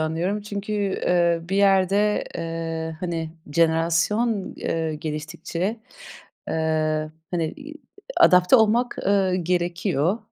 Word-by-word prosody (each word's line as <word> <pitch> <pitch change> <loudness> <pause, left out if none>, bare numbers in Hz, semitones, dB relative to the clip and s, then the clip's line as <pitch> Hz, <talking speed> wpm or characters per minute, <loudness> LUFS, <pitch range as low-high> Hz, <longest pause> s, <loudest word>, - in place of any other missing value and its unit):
anlıyorum 165 +6 -1
çünkü, 205 0 -5
eee, 180 -4 +1
bir 195 - 0
yerde, 200 +1 +3
eee, 165 -1 -4
hani, 165 -3 -3 0.2
jenerasyon, 170 +7 +1
eee, 160 -1 -2
geliştikçe. 160 +6 -4 0.7
Eee, 155 -1 0 0.2
hani, 165 -3 -1
iii, 305 +2 -10 0.5
adapte 180 +6 +6
olmak, 230 +2 +2
eee, 195 -2 +2
gerekiyor. 175 +1 0
175 Hz, 100 wpm, -23 LUFS, 160-200 Hz, 0.7 s, adapte